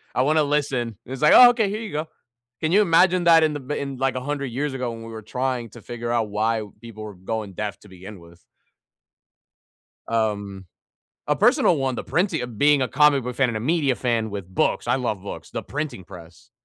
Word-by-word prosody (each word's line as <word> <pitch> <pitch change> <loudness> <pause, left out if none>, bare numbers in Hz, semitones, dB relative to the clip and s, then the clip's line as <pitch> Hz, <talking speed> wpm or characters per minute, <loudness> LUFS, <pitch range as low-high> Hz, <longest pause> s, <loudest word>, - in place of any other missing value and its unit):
I - - +2
wanna 155 +3 +3
listen." 135 -6 -1
It's 130 +2 -7
like, 150 - +6
"Oh, 250 -1 +10
okay. 230 -4 +1
Here 215 +3 -4
you 215 - -6
go." 155 +2 -3 0.5
Can 160 +1 0
you 205 +3 +5
imagine 180 0 +3
that 165 -1 +6
in 155 -1 +1
the 145 - -4
b 135 +3 -5
in, 140 -1 -5
like, 135 0 0
100 140 +2 -3
years 135 +3 -3
ago, 125 -2 -3
when 115 0 -9
we 115 - -9
were 110 -1 -8
trying 125 +1 -3
to 120 - -13
figure 120 0 -5
out 115 -3 0
why 110 +2 0 0.2
people 110 -2 -10
were 105 - -8
going 100 +2 -5
deaf 105 +1 -5
to 105 - -17
begin 95 +2 -11
with? 85 +1 -18 1.6
Um, 100 -4 -2 0.6
a - - +1
personal 165 - +4
one, 135 -2 -1
the - - -4
printing 180 -4 0
of 120 -3 -7
being 145 -2 +4
a 130 - -1
comic 150 -2 +4
book 125 0 -6
fan 135 -3 +2
and 115 - -3
a - - -3
media 145 0 +1
fan 115 -3 -1
with 100 -3 -6
books. 95 - 0
I - - +3
love 110 -7 -3
books. 100 - -8
The - - -4
printing 145 - -5
press, 85 -3 -14
125 Hz, 220 wpm, -23 LUFS, 110-150 Hz, 1.6 s, Oh